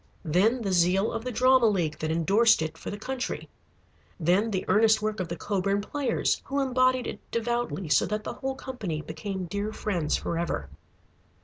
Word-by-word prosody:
Then 210 +10 +2
the 195 - -1
zeal 185 +3 +3
of 225 -1 -4
the 250 - -3
Drama 255 0 +5
League 170 -7 0
that 155 - -2
indorsed 195 +5 +4
it 160 0 -4
for - - -7
the 205 - -5
country. 255 +4 -4 0.7
Then 185 +7 +2
the 190 -3 -2
earnest 220 +3 +4
work 215 -1 -2
of 185 - -2
the 170 - -4
Coburn 200 +1 0
Players 255 +3 -1
who 280 +1 -1
embodied 255 -1 +2
it - - -5
devoutly, 235 -5 -2
so 150 - +3
that 210 0 -2
the - - -4
whole 265 0 -4
company 205 -13 -5
became 185 +4 -5
dear 205 +4 -3
friends 175 -8 -1
forever. 170 - -3
205 Hz, 180 wpm, -27 LUFS, 175-240 Hz, 0.7 s, Drama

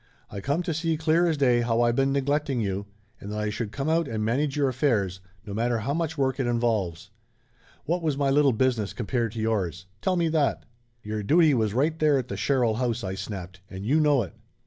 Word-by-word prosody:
I 100 - -6
come 145 - 0
to 170 - -2
see 165 0 -1
clear 160 +2 +2
as 160 -2 +1
day 125 -4 +3
how 115 0 +1
I 120 0 +4
been 135 +3 +1
neglecting 140 -1 0
you, 100 -2 -2 0.3
and 100 - -7
that 105 - -3
I 105 0 -1
should 105 0 -4
come 135 +4 -3
out 165 0 +2
and 110 -3 -2
manage 135 +5 0
your 140 -2 +3
affairs, 115 -9 0 0.3
no 100 - -6
matter 120 +2 0
how 115 +6 -2
much 165 0 -2
work 130 -1 0
it 130 - 0
involves. 110 -8 -1 0.7
What 170 +4 0
was 155 -4 0
my 140 -1 +1
little 140 0 +4
business 115 -3 0
compared 120 -1 -1
to 115 - -5
yours? 95 -6 -1 0.2
Tell 185 - +1
me 170 -2 +1
that 155 -3 0 0.2
!" 120 -1 -42
"Your 105 0 -3
duty 155 - +4
was 110 -4 0
right 155 +5 +1
there 150 -2 +4
at 125 -2 -3
the - - -3
Sherrill 125 -6 +1
house!" 120 -2 -1
I 95 -1 -3
snapped. 95 -2 -7
"And 95 +1 -7
you 145 +7 +3
know 145 -5 +3
it." 90 - -10
125 Hz, 230 wpm, -26 LUFS, 105-145 Hz, 0.7 s, I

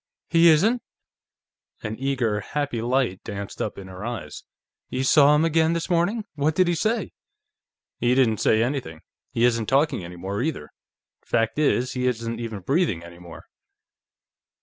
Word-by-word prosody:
"He 170 0 +6
isn't?" 215 +10 +3 1.0
An 110 0 -3
eager, 125 -6 0
happy 140 +1 -3
light 120 -5 0
danced 100 -2 -6
up 105 - -3
in 95 -1 -9
her 95 +1 -9
eyes. 110 -11 -6 0.5
"You 130 +1 -2
saw 145 +2 +6
him 155 +2 +3
again 165 0 +2
this 170 +2 -3
morning? 185 +6 +1
What 150 +1 0
did 185 0 +3
he 175 - +2
say?" 215 +5 -1 0.9
"He 120 +1 +2
didn't 120 -5 +3
say 110 +1 +3
anything. 120 - -3 0.3
He 115 - +2
isn't 115 -3 +1
talking 140 - +2
any 85 +1 -9
more, 95 +5 -4
either. 140 - -3 0.5
Fact 115 +5 0
is, 130 -4 +2
he 125 0 -1
isn't 115 -1 -2
even 110 -4 -5
breathing 135 - 0
any 85 0 -12
more." 85 -1 -12
125 Hz, 160 wpm, -24 LUFS, 105-155 Hz, 1.0 s, He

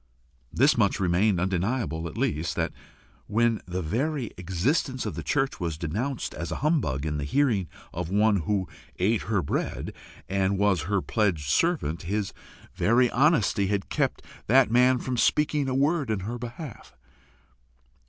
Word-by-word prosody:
This - - +3
much - - +2
remained 95 +1 +2
undeniable 90 - -1
at 80 - -9
least, 75 +3 -1
that - - -1 0.6
when 115 +1 +2
the 90 0 -3
very 130 - -1
existence 125 - -1
of - - -3
the - - -5
church 140 -1 0
was 85 -4 -2
denounced 110 - -3
as 85 - -5
a - - -2
humbug 80 - +1
in 75 -1 -2
the - - -2
hearing 110 - +1 0.3
of 85 0 -4
one 105 +2 +3
who 95 +2 -1 0.3
ate 105 +4 +2
her 100 -5 0
bread, - - -3 0.3
and 95 +1 +1
was 95 -5 +2
her 100 -3 +1
pledged 85 - 0
servant, 150 - +1
his 100 +2 -2 0.4
very 120 +2 +3
honesty 125 - +3
had 100 0 -1
kept - - -1 0.2
that 130 0 +5
man 125 +2 +5
from 125 0 -3
speaking 150 +1 +2
a 130 - -1
word 145 0 +1
in 105 -3 -1
her 115 +5 -4
behalf! 120 - -8
105 Hz, 155 wpm, -26 LUFS, 90-130 Hz, 0.6 s, that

